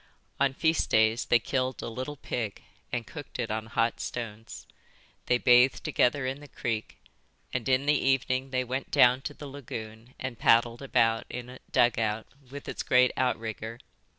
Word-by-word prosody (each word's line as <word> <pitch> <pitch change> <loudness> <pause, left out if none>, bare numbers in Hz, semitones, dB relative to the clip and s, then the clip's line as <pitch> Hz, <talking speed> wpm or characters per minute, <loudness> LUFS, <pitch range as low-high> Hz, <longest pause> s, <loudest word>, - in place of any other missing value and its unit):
On 135 -1 +2
feast 160 +2 +1
days 110 +1 +3
they 120 - +5
killed 130 +2 -2
a - - -3
little 130 +5 -5
pig 115 -5 -4 0.3
and 120 -1 -2
cooked 145 +4 -9
it 120 -3 -2
on 110 0 -3
hot 115 +1 0
stones. 115 -2 -6 0.6
They 125 - +4
bathed 125 +1 +5
together 130 +2 +2
in 130 +2 -3
the 145 - -12
creek; 115 -4 -4 0.6
and 125 0 -2
in 130 +1 +3
the 150 -1 +3
evening 130 0 +1
they 130 -1 0
went 130 +2 -4
down 125 +1 +5
to 145 +1 -6
the 150 - -9
lagoon 115 -4 -8
and 130 -3 -5
paddled 115 +1 +4
about 115 -4 +2
in 125 0 -6
a 125 - -11
dugout, 110 -2 +2 0.2
with 140 +1 -9
its - - -4
great 125 -1 +4
outrigger. 115 -2 -2
125 Hz, 170 wpm, -28 LUFS, 115-130 Hz, 0.6 s, they